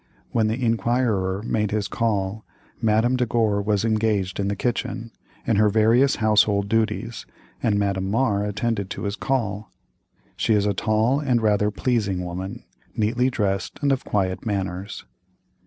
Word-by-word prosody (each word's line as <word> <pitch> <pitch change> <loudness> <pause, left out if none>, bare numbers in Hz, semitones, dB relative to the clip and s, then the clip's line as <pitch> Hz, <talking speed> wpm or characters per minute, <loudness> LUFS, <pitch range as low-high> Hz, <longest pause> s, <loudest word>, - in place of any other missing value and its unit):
When 110 -2 +2
the 110 +3 -1
inquirer 115 -5 0
made 105 -2 0
his 105 -1 -1
call, 105 -2 -1 0.4
Madame 115 +3 +2
de 125 -1 +1
Gore 110 -3 +1
was 105 +1 0
engaged 105 -4 0
in 100 - 0
the 100 - -1
kitchen, 115 +1 -3 0.3
in 110 - +2
her 105 0 +5
various 115 +6 +4
household 105 -2 +3
duties, 110 +1 -1 0.3
and 105 -3 +1
Madame 100 -2 0
Mar 105 -2 +1
attended 105 -1 -2
to - - -5
his 100 -1 -2
call. 110 -6 -2 0.6
She 110 - +2
is 105 -1 +2
a 105 - +1
tall 110 +7 +1
and 130 -5 +1
rather 105 -2 +2
pleasing 100 -5 -1
woman, 90 +2 -6 0.3
neatly 120 +4 +2
dressed 100 -6 -2
and 140 - +3
of 135 - 0
quiet 95 -3 -1
manners. 95 -2 -4
105 Hz, 155 wpm, -23 LUFS, 100-115 Hz, 0.6 s, her